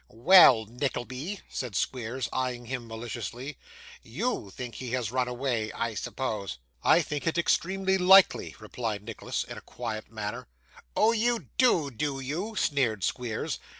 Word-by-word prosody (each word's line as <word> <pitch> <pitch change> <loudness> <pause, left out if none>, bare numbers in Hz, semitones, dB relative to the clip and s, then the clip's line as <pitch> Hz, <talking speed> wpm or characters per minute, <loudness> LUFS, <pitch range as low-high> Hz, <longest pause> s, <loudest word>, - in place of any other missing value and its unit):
'Well, 120 - +7
Nickleby,' 130 - -4
said 125 -6 -5
Squeers, 125 +3 -2
eyeing 125 -2 -2
him 120 -1 -5
maliciously. 120 +4 -6 0.4
'YOU 245 - -3
think 120 +4 -7
he 125 -2 -6
has 120 -4 -1
run 125 0 0
away, 120 -4 -2
I 115 -1 -2
suppose?' 105 - -3 0.2
'I 170 - +5
think 150 +1 -4
it 165 - +1
extremely 190 +3 +1
likely,' 190 +1 +6
replied 105 -1 -4
Nicholas, 115 0 -4
in - - -8
a - - -19
quiet 110 0 -6
manner. 105 -2 -5 0.5
'Oh, 220 - +5
you 235 +1 0
do, 175 - +4
do 135 +3 -2
you?' 170 +12 -4
sneered 130 - +1
Squeers. 115 +1 -2
125 Hz, 145 wpm, -28 LUFS, 115-165 Hz, 0.5 s, Well